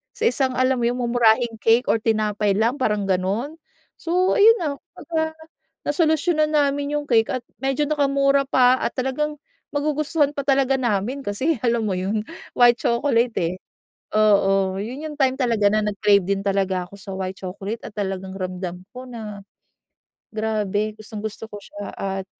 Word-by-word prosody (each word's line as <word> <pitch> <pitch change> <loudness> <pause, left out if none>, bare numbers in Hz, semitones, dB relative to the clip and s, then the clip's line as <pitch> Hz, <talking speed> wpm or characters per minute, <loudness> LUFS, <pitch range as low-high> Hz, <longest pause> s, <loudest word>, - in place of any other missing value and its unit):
sa - - -5
isang 260 0 +2
alam 255 0 +2
mo 235 - +1
yun 245 - 0
mumurahing 235 -1 +2
cake 230 +4 +4
or 225 - +1
tinapay 210 -2 +1
lang 230 +6 +1
parang 210 -5 +1
ganon, 195 - -1 0.4
so 360 +2 +1
ayun 450 +1 +7
na. 325 - -1 0.3
Kumbaga 320 -1 -2 0.5
nasolusyunan 310 0 +1
namin 285 0 +1
yung 295 -1 -3
cake 225 -2 +3
at 255 - -3 0.2
medyo 270 +2 0
nakamura 275 -2 +2
pa 255 -1 +4
at - - -1
talagang 280 +3 -2 0.3
magugustuhan 295 0 0
pa 280 - -2
talaga 270 -1 +3
namin, 240 +3 -1
kasi 260 +11 0
alam 235 -1 +1
mo - - -1
yun 200 +4 -1 0.3
white 240 -1 +5
chocolate 235 -1 +1
eh. 170 +2 -1 0.6
Oo 195 -2 +3
yun 255 +8 -6
yung 300 - -8
time 265 0 +3
talaga 225 -5 +3
na 215 0 +2
nag 210 -1 -2
crave 200 -3 +4
din 195 +1 -1
talaga 190 -2 0
ako 200 - -13
sa 195 0 -8
white 190 0 -4
chocolate 195 +4 -5
at - - -8
talagang 190 -1 -3
ramdam 180 -1 -5
ko 255 +1 -8
na 215 -4 -7 0.9
grabe 215 -1 -1
gustong 215 0 -8
gusto 220 +1 -5
ko 205 - -7
siya 205 0 -8
at 195 -1 -3
230 Hz, 165 wpm, -22 LUFS, 205-275 Hz, 0.9 s, ayun